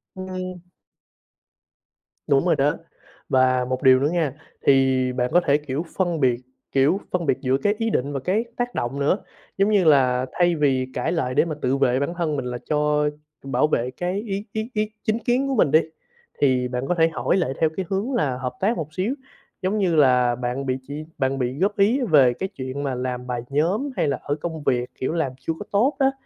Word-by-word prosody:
Ừm. 185 -1 -6 1.7
Đúng 135 -1 +3
rồi - - +3
đó. 145 +3 +1 0.5
Và 130 -1 +3
một 130 0 -3
điều 130 -1 +7
nữa 145 - +1
nghe, 165 -5 0 0.3
thì 130 -2 +3
bạn 125 0 0
có 175 - +6
thể, 140 - +4
kiểu, 150 +2 -4
phân 175 -4 0
biệt, 125 -4 +2 0.3
kiểu, 140 +8 +3
phân 180 -2 -1
biệt 130 - +2
giữa 130 -1 +2
cái 205 +9 +1
ý 225 0 0
định 140 - -1
và 135 - -2
cái 190 - 0
tác 245 0 -2
động 125 +4 -2
nữa, 145 +7 +2 0.4
giống 195 +2 +3
như 205 -3 +4
là 130 -4 +4
thay 175 -1 +2
vì 135 -4 +1
cãi 125 - -1
lại 130 -7 -1
để - - +4
mà 160 -3 -3
tự 130 +2 +1
vệ 130 -1 +2
bản 140 +4 -1
thân 160 -4 0
mình 135 - -3
là 125 0 -3
cho 150 0 +2 0.3
bảo 135 +2 +1
vệ 125 -4 0
cái 180 +8 -3
ý 200 -2 -4
ý 220 +2 -3
ý 215 0 -1
chính 220 +1 0
kiến 245 +3 +1
của 270 - 0
mình 155 - +3
đi, 155 - +7 0.6
thì 130 -3 +2
bạn 125 +1 -3
có 180 - +1
thể 165 -1 +4
hỏi 165 +3 0
lại 135 -8 0
theo 160 - +4
cái 190 - -2
hướng 200 +7 -1
là 140 - 0
hợp 125 -1 -4
tác 215 +5 +1
một 155 -2 -5
xíu, 190 +8 -1 0.5
giống 190 +3 0
như 185 -5 +1
là 125 -4 +4
bạn 125 +2 -3
bị 130 -1 0
chỉ 145 +2 -5
bạn 135 -1 0
bị 125 +2 -2
góp 200 +3 +1
ý 220 +7 +3
về 135 -6 +6
cái 190 +9 -4
chuyện 135 -5 -5
mà 135 -2 -2
làm 125 0 -4
bài 125 -1 -2
nhóm 180 - 0
hay - - +2
là 140 - 0
ở 145 - -1
công 160 0 -5
việc, 125 -3 0
kiểu, 130 - -2
làm 160 -6 0
chưa 165 - -2
có 205 - -6
tốt 245 +8 +2
á, 270 0 +4
150 Hz, 220 wpm, -23 LUFS, 130-185 Hz, 1.7 s, điều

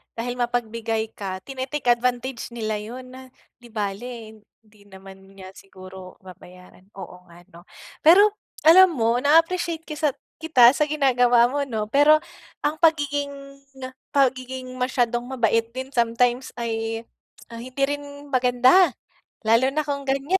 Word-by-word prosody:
dahil 245 +2 -5
mapagbigay 230 -2 -2
ka 190 -3 -7
tine-take 265 -1 -2
advantage 245 +1 -2
nila 215 -2 -3
'yon 250 +4 -9
na, 260 0 -12 0.3
'di 240 - -15
bale, 220 +1 -6 0.2
hindi 210 -1 -25
naman 190 0 -14 0.2
niya 190 -1 -11
siguro 185 -1 -13
babayaran, 185 0 -16
oo 180 -2 -11
nga, 175 +1 -17
'no. 170 +2 -16 0.3
Pero, 400 +7 +6 0.3
alam 345 +2 +7
mo 230 0 +1
na-appreciate 330 +3 +1
kisat 300 -3 -2 0.2
kita 255 -7 +6
sa 300 +2 0
ginagawa 245 -5 +3
mo, 285 - -2
'no. 215 -3 -4
Pero, 290 +3 +6 0.5
ang 300 +2 -1
pagiging, 285 -3 -1 0.6
pagiging 255 -1 -1
masyadong 245 -1 -1
mabait 230 -1 +1
din 260 +1 -6
sometimes, 240 +1 0
ay, 225 -1 -4 0.5
ah, 230 - -8
hindi 255 +3 -4
rin 285 0 -5
maganda. 255 +8 +4 0.5
Lalo 235 +4 +3
na 300 0 -2
kung 280 -1 -3
ganyan, 275 +7 -1
245 Hz, 130 wpm, -23 LUFS, 225-280 Hz, 0.6 s, alam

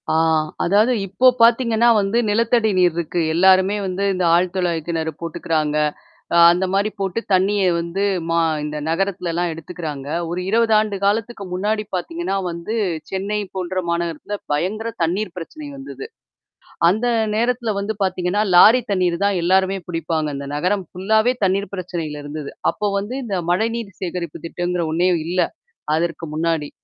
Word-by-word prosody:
ஆ, - - +1 0.5
அதாவது 210 +7 +3
இப்போ 250 +7 +3
பார்த்தீங்கன்னா 230 0 +4
வந்து 200 +3 0
நிலத்தடி 230 +1 +2
நீர் 180 -2 +4
இருக்கு. 170 +1 -2
எல்லாருமே 190 +3 +4
வந்து 185 +1 -2
இந்த 185 -1 -1
ஆழ 175 - +4
துழாய்க்கிணறு 165 -3 -1
போட்டுக்கிறாங்க. 155 -2 -1 0.6
அ - - +4
அந்தமாரி 190 +4 +1
போட்டு 195 +2 -1
தண்ணீய 195 +2 +3
வந்து 170 +4 -2 0.2
மா 165 0 +1 0.3
இந்த 150 0 -4
நகரத்துலலாம் 175 -1 -1
எடுத்துக்கறாங்க. 160 -3 -7 0.2
ஒரு 175 +1 -2
20 225 0 +3
ஆண்டு 215 -2 0
காலத்துக்கு 210 +1 -1
முன்னாடி 210 +3 0
பார்த்தீங்கன்னா, 330 - -2
வந்து 170 +7 -4 0.3
சென்னை 200 +2 -2 0.2
போன்ற 185 0 -2
மாநகரத்தில 170 +4 -3
பயங்கர 215 +9 -1
தண்ணீர் 180 +3 -1
பிரச்சனை 290 - -8
வந்தது. 275 +9 -8 0.8
அந்த 215 +7 0 0.3
நேரத்துல 235 0 0
வந்து 210 +2 -3
பார்த்தீங்கன்னா, 185 +2 0
லாரி 220 +8 +8
தண்ணீர் 180 -3 +1
தான் 200 -3 +1
எல்லாருமே 190 +2 +2
புடிப்பாங்க. 165 -2 -1
அந்த 140 0 -6
நகரம் 180 +5 0
ஃபுல்லாவே 220 +6 +2
தண்ணீர் 195 +1 0
பிரச்சனையில 165 -5 -5
இருந்தது. 145 0 -6 0.2
அப்போ 210 - -2
வந்து 205 +6 -5
இந்த 205 -4 -2 0.2
மழைநீர் 220 +1 -1
சேகரிப்பு 175 -3 -5
திட்டங்கிற 175 +1 -2
ஒண்ணே 175 +3 +2 0.2
இல்ல. 180 +2 -1 0.6
அதற்கு 165 +1 -2
முன்னாடி. 160 -2 -1
185 Hz, 140 wpm, -20 LUFS, 170-210 Hz, 0.8 s, லாரி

